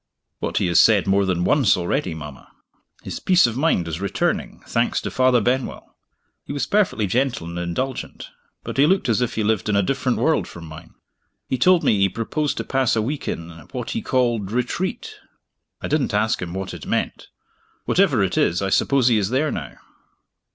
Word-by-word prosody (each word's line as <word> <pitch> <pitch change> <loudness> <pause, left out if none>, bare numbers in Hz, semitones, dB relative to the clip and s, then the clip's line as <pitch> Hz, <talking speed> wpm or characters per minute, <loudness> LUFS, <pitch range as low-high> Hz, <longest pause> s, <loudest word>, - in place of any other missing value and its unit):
"What - - -2
he - - +2
has 85 -2 +5
said 105 -4 +4
more 100 0 +2
than 90 -2 0
once 130 -1 +3
already, 85 -1 -1
mama. 75 -3 -10 0.5
His - - -6
peace 185 -1 +4
of 115 -2 -1
mind 130 - +1
is 85 +2 -4
returning, 100 - -2
thanks - - 0
to - - -5
Father 130 -2 +3
Benwell. 125 +4 -2 0.5
He - - -8
was 140 -3 -1
perfectly 195 - +1
gentle 120 -2 0
and 85 +1 -5
indulgent 120 +10 -4 0.3
but - - -6
he 140 +2 +5
looked 185 -6 +1
as 115 +1 +2
if 125 - -1
he 110 - 0
lived 105 -1 0
in 105 - +1
a 100 - +3
different 130 +2 0
world 160 -1 +1
from 85 -1 -10
mine. 80 +1 -12 0.5
He 130 - -2
told 180 +5 +4
me 105 - +3
he 100 0 +3
proposed 145 - -2
to - - -2
pass 130 -4 +1
a 110 - +1
week 140 +6 -4
in, 85 0 -4 0.2
what - - -4
he - - -2
called, 120 -6 0
Retreat. 185 - -3 0.7
I - - -1
didn't 140 -8 0
ask 110 +3 +1
him 90 0 -5
what 95 -1 -4
it - - -9
meant. - - -2 0.6
Whatever 150 - +3
it 95 - 0
is, 85 +2 +2
I 95 - -1
suppose 135 +2 +3
he 115 -3 +4
is 100 -1 -1
there 140 +5 +1
now." 65 -3 -6
115 Hz, 200 wpm, -22 LUFS, 95-135 Hz, 0.7 s, has